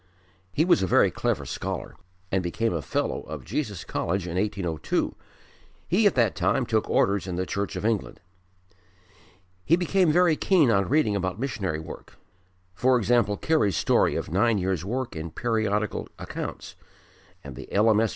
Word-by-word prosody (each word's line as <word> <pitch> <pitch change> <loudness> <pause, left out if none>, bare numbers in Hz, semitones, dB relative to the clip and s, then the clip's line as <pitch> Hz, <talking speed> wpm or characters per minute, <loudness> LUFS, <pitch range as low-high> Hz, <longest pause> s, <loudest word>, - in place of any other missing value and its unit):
He 155 - +2
was 175 - +4
a 95 - +1
very - - +4
clever - - -1
scholar - - -5 0.4
and 95 - +2
became 95 +5 -1
a 85 - -2
Fellow 65 - -2
of - - -7
Jesus - - -3
College 95 +1 -2
in 85 -1 -5
1802. 95 -5 -1 0.7
He 205 +5 +4
at 200 - +1
that 115 -6 +3
time - - +1
took - - 0
orders 100 0 +2
in 90 - -3
the 90 +1 -1
Church 100 +2 -3
of - - -4
England. 110 -3 -1 1.4
He 160 - +4
became 180 -1 +2
very 175 0 +4
keen 160 -7 +3
on 100 -3 +2
reading 135 -7 +2
about 95 0 -2
missionary 110 - -2
work, 80 0 -10 0.7
e.g. 120 -2 +4 0.2
Carey's 155 - +2
story - - +2
of - - -4
nine 105 +5 +3
years' 95 -3 -1
work 125 +4 -3
in 80 +1 -5
Periodical 110 -1 -1
Accounts, - - -6 0.7
and 70 -2 -9
the 65 +1 -10
L.M.S. 110 +1 +3
105 Hz, 160 wpm, -26 LUFS, 95-125 Hz, 1.4 s, was